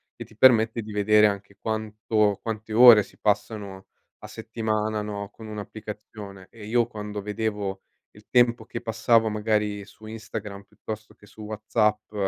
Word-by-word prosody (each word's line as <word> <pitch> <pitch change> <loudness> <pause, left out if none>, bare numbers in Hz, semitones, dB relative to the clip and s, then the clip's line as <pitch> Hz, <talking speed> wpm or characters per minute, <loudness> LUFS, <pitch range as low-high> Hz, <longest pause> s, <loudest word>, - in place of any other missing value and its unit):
e - - -7
ti 110 - -20
permette 115 -2 +5
di 110 0 -9
vedere 105 +1 +4
anche 100 -1 -5
quanto 110 -1 0
quante 110 -1 -5
ore 120 -1 +9
si - - -19
passano 105 -2 -2 0.4
a - - -7
settimana, 110 -1 -2
no, 100 -1 -5
con 110 +1 -12
un'applicazione 105 -2 -9
e 110 -3 -11
io 120 +1 +2
quando 105 -3 -7
vedevo 105 -2 -3 0.3
il 105 0 -19
tempo 120 -2 +3
che - - -6
passavo 115 0 +2
magari 105 -1 -1
su 110 +2 -16
Instagram 110 -2 -7
piuttosto 105 +1 -9
che 105 - -19
su 110 - -15
WhatsApp 105 0 -1
105 Hz, 150 wpm, -25 LUFS, 105-110 Hz, 0.4 s, ore